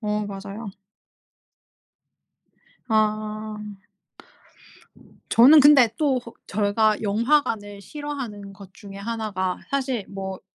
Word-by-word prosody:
어 210 -1 -2
맞아요. 200 +2 -7 2.2
아. 215 0 -1 1.7
저는 275 +7 +8
근데 280 -4 +7
또 275 -5 +1 0.3
저희가 210 +2 +1
영화관을 220 -2 0
싫어하는 245 -7 -7
것 195 -1 -14
중에 200 -2 -12
하나가 200 -3 -3
사실 265 -6 -1
뭐 190 -1 -6
215 Hz, 170 characters per minute, -23 LUFS, 200-245 Hz, 2.2 s, 저는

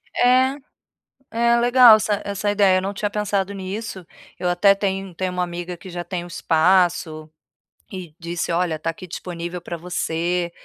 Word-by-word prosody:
É, 255 +2 +4 0.8
é 235 +1 +3
legal 240 -2 +7
essa 210 -1 -1
essa 200 +1 -1
ideia 195 -2 +4
eu - - 0
não 195 +1 -3
tinha 205 0 -2
pensado 200 -1 -1
nisso, 195 -1 -6 0.3
eu 180 - 0
até 195 +3 +5
tenho 195 -2 -3
tenho 185 0 -2
uma 180 0 -1
amiga 175 0 -5
que 185 - -11
já 175 0 -5
tem 175 0 -5
o - - -9
espaço, 165 -2 +1 0.6
e 180 -5 -8
disse: 170 0 -3
"Olha, 170 -1 0
está 155 +1 -3
aqui 180 +3 -7
disponível 175 0 -6
pra 170 0 -6
você, 175 0 -2
185 Hz, 170 wpm, -22 LUFS, 175-205 Hz, 0.8 s, legal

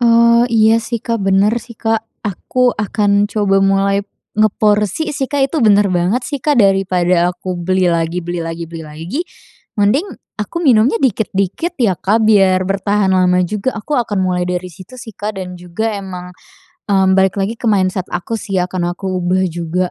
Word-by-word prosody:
Oh, 235 0 +5
iya 225 0 +4
sih, 230 0 -4
Kak, 230 -2 -2
bener 195 +2 +2
sih, 235 - -13
Kak. 225 -1 0 0.2
Aku 245 +6 0
akan 205 0 +1
coba 200 -3 +1
mulai 195 0 +2 0.4
ngeporsi 210 - +1
sih, 270 -1 -2
Kak, 275 -2 0
itu 325 - -3
bener 205 -3 +4
banget 180 +8 +1
sih, 285 +1 -4
Kak, 295 +1 +1
daripada 185 -4 +2
aku 185 -2 -5
beli 185 0 +1
lagi 170 +1 -1
beli 175 0 -4
lagi 165 0 -5
beli 165 -1 -7
lagi, 165 - -5 0.6
mending 220 - +2 0.3
aku 275 - -4
minumnya 230 -4 +4
dikit-dikit 220 - -1
ya, 190 -8 +1
Kak, 220 +3 +1
biar 190 -3 +4
bertahan 195 +1 0
lama 180 -1 +3
juga, 210 +7 -2
aku 250 +6 -2
akan 210 -4 -1
mulai 180 -1 0
dari 180 0 -3
situ 185 +9 -13
sih, 235 -2 -9
Kak. 210 +1 -5
Dan 180 -1 -6
juga 180 +6 -3
emang, 180 -2 -8 0.6
mmm, 190 -1 +3
balik 190 -1 +3
lagi 200 +4 -2
ke 235 - -5
mindset 185 -3 +1
aku 180 +6 -4
sih 195 -3 -4
ya 180 - -4
akan 175 -1 -2
aku 190 0 -5
ubah 180 +1 +1
juga. 175 +2 -2
195 Hz, 180 wpm, -16 LUFS, 180-225 Hz, 0.6 s, Oh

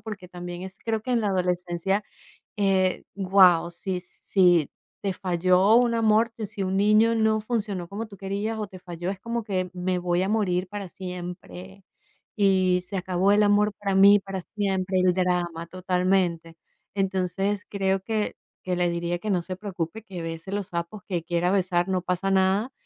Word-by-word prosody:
Porque 200 -5 -8
también 175 0 -7
es 190 0 -9
creo 220 -1 -2
que 255 - -5
en 240 -2 +2
la 210 - 0
adolescencia, 180 +1 -1 0.5
eh, 190 -2 +2
guau, 185 -3 +5
si 180 +1 -4
si 175 -3 +2 0.3
te 195 -2 -1
falló 185 +3 +3
un 240 -1 +4
amor, 225 0 +3
si 200 -1 -4
un 185 0 -1
niño 215 +3 +4
no 220 -1 +2
funcionó 210 -6 -3
como 215 +4 -5
tú 200 -2 -13
querías 200 +3 -3
o 210 -2 -3
te 185 -1 -12
falló, 175 0 -5
es 195 - -7
como 235 +1 -3
que 185 -4 -2
me 180 0 -1
voy 175 +1 0
a 195 - -1
morir 185 -4 0
para 200 -1 -6
siempre, 180 +1 -8 0.5
y 185 -3 +3
se 195 - -4
acabó 185 +1 +1
el 210 +1 +5
amor 205 0 +3
para 200 -1 -1
mí 200 +1 +7
para 195 -1 -6
siempre, 190 -2 0
el 180 -1 +4
drama 175 -2 -1
totalmente. 180 -2 0 0.4
Entonces, 195 +1 -1
creo 195 -1 0
que 215 +1 -2 0.3
que 180 -1 -1
le 175 -1 +2
diría 170 0 -2
que 215 - -5
no 180 -3 +2
se 185 +1 -5
preocupe, 190 0 -5
que 185 -5 -7
bese 165 +3 -6
los 205 -2 -2
sapos, 170 +4 -5
que 175 -4 -2
quiera 175 +1 0
besar 180 -2 +1
no 185 -1 0
pasa 180 +2 -1
nada, 195 +5 +2
190 Hz, 180 wpm, -25 LUFS, 180-205 Hz, 0.5 s, mí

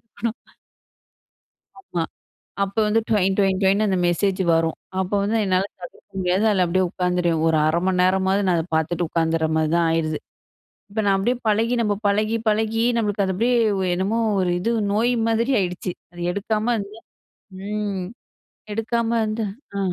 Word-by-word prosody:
எடுக்கணும். 230 +1 -5 1.4
ஆமா. 175 - -3 0.6
அப்ப 195 0 -5
வந்து 220 +2 +3
டொயின் 195 -3 +2
டொயின்னு 195 +1 +2
அந்த 190 - +1
மெசேஜ் 190 +3 +1
வரும். 165 0 +1 0.2
அப்ப 190 +1 -2
வந்து 210 +3 0
என்னால 185 +1 +2 0.2
தவிர்க்க 175 +2 -11
முடியாது, 185 +3 +1
அதுல 190 -3 +3
அப்டியே 185 +2 +1
உட்காந்துருவேன். 180 -3 0
ஒரு 160 -1 +3
1/2 160 +2 +2
மணி 185 -1 +1
நேரமாவது, 190 +2 +2
நான் 180 -2 +3
அத 160 - -3
பாத்துட்டு 165 +2 0
உட்காந்துற 165 -1 +1
மாரி 155 -1 +1
தான் 170 0 +3
ஆயிருது. 155 -2 0 0.7
இப்ப 220 +1 -1
நான் 195 -1 +4
அப்டியே 240 +6 0
பழகி, 225 +3 +2
நம்ம 210 -2 +1
பழகி 215 +3 +1
பழகி 220 +1 +1 0.2
நமக்கு 205 -2 0
அது 190 - -1
அப்டியே 240 +5 +2 0.2
ஒ - - 0
என்னமோ 200 +5 0 0.2
ஒரு 180 -1 +1
இது 230 +6 0 0.2
நோய் 235 +4 +2
மாதிரி 230 +4 +1
ஆயிடுச்சு 180 0 -2 0.2
அது 175 - -13
எடுக்காம 215 +4 -1
இருந்தா 205 +2 -7 0.7
ம். 205 -3 -2 0.7
எடுக்காம 225 +1 -1 0.2
வந்து 215 +1 -2 0.3
அ - - -1
195 Hz, 155 wpm, -22 LUFS, 180-215 Hz, 1.4 s, நான்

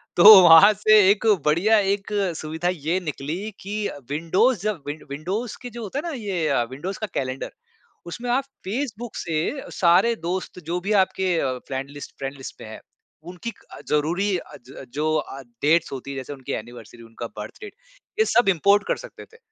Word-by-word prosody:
तो 200 +2 +10
वहाँ 170 +5 +9
से 215 +1 +5
एक 210 +2 +2 0.2
बढ़िया 180 +9 +4
एक 200 +1 -1 0.2
सुविधा 160 +3 -3
ये 165 +3 -1
निकली 165 +5 -5
कि 205 +2 -3 0.2
विंडोज़ 185 - +1
जब 210 -7 -2
विं 145 - -4
विंडोज़ 185 +12 -4
के 245 - -7
जो 235 0 -8
होता 215 +7 -4
है 300 - -5
ना, - - -3
ये 175 - -1
विंडोज़ 180 +9 -6
का 215 - -3
कैलेंडर, 130 0 -3 0.5
उसमें 235 +8 -6
आप 265 +2 +2 0.2
फेसबुक 235 +1 -4
से 165 - -2 0.2
सारे 190 +6 +4
दोस्त, 180 0 -4
जो 175 +2 -2
भी 200 - -3
आपके 185 -1 -2
अ, 130 -3 -1
फ्रेंड 135 0 -4
लिस्ट 145 0 -10
फ्रेंड 135 +1 -4
लिस्ट 135 - -9
पे - - -9
हैं, 110 - -9 0.5
उनकी 230 +6 -6
क - - -24
अ, - - -10
ज़रूरी 175 +7 +1
अ, - - -11
ज - - -13
अ, - - -8
जो 155 +2 0
अ, 135 -2 -5 0.2
डेट्स 165 +3 +2
होती 135 +1 -6
हैं, 135 - -6
जैसे 130 +2 -6
उनकी 135 -2 -8
एनिवर्सरी, 115 0 -8
उनका 115 +1 -8
बर्थ 105 - -8
डेट, 415 -1 -9 0.5
ये 440 - +5
सब 240 - +3
इम्पोर्ट 200 +3 +3
कर - - 0
सकते - - -11
थे। 460 - -16
180 Hz, 195 wpm, -23 LUFS, 145-210 Hz, 0.5 s, तो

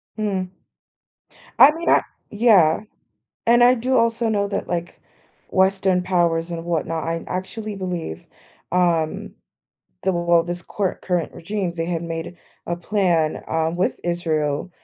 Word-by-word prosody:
Hmm. 200 -4 -2 1.1
I 285 - +10
mean, 335 +2 -3
I - - +5 0.3
yeah. 205 -7 +4 0.7
And 240 +1 +6
I 250 +1 +7
do 255 +2 0
also 230 0 +2
know 200 -2 +1
that, - - -3
like, 175 -1 -4 0.5
Western 190 -1 +2
powers 170 -2 +1
and 165 -1 -4
whatnot 165 -1 -2
I 165 0 -3
actually 210 +3 -5
believe, 180 - -5 0.5
um, 170 -3 +1 0.7
the 190 - +1
well, 170 -1 +3
this 175 +1 -5
cor 195 -3 -2
current 180 -3 -1
regime, 190 0 -3
they 165 -1 -3
had 170 -1 -2
made 165 +1 -5 0.3
a 170 - -2
plan, 175 -4 0
um, 160 +1 0
with 185 - 0
Israel, 160 -2 -1
180 Hz, 135 wpm, -22 LUFS, 165-200 Hz, 1.1 s, I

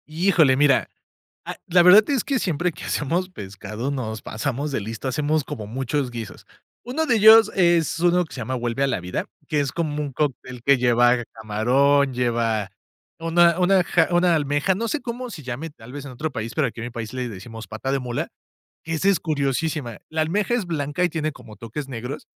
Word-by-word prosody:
Híjole, 160 -3 +3
mira, 140 -2 +3 0.6
ah, - - -5
la 175 0 +5
verdad 200 +7 +7
es 275 -4 +1
que 275 -3 0
siempre 175 -1 0
que 160 - -10
hacemos 170 +6 -1
pescado, 110 - -6
nos 110 -6 -4
pasamos 135 +6 -3
de 135 - -1
listos, 110 +5 -5
hacemos 150 +3 0
como 105 -5 -7
muchos 130 +3 -2
guisos. 115 -4 -8 0.4
Uno 285 +7 -1
de 250 -6 +2
ellos, 220 0 +8
es 170 -3 +2
uno 175 +1 +3
que - - -14
se 130 - -6
llama 130 +3 -3
Vuelve 120 +2 -1
a - - +3
la 135 - -1
vida, 90 +1 -3 0.2
que 150 - 0
es 140 -3 -1
como 150 -2 -2
un 145 -2 -4
cóctel, 130 -3 -3
que 140 +1 +5
lleva 120 0 +3
camarón, 130 +6 +2
lleva 115 -4 0 0.5
una 170 +1 +3
una 185 0 +4
ja 165 -1 +2
una 175 0 +4
almeja, 145 +4 +1
no 230 +4 -2
sé 290 +5 -2
cómo 245 0 -5
se 155 -10 -9
llame, 130 +6 -5
tal 125 -5 -14
vez, 145 +1 -7
en 140 - -8
otro 150 +5 -4
país, 115 -3 -5
pero 155 -4 +1
aquí, 115 - -8
en 115 - -4
mi - - -5
país, 115 -1 -6
le 125 -1 -3
decimos 110 +1 -9
Pata 110 +7 -4
de 135 - +1
mula, 125 -2 -3 0.6
que 165 - -4
esa 175 +5 +1
es 200 - +3
curiosísima. 145 -4 -2
La 160 0 -2
almeja 200 +8 0
es 230 -6 -1
blanca, 150 0 -1
y - - +3
tiene 155 -2 -2
como 120 -5 -13
toques 115 +7 -7
negros, 125 +3 -6
145 Hz, 210 wpm, -23 LUFS, 120-170 Hz, 0.6 s, ellos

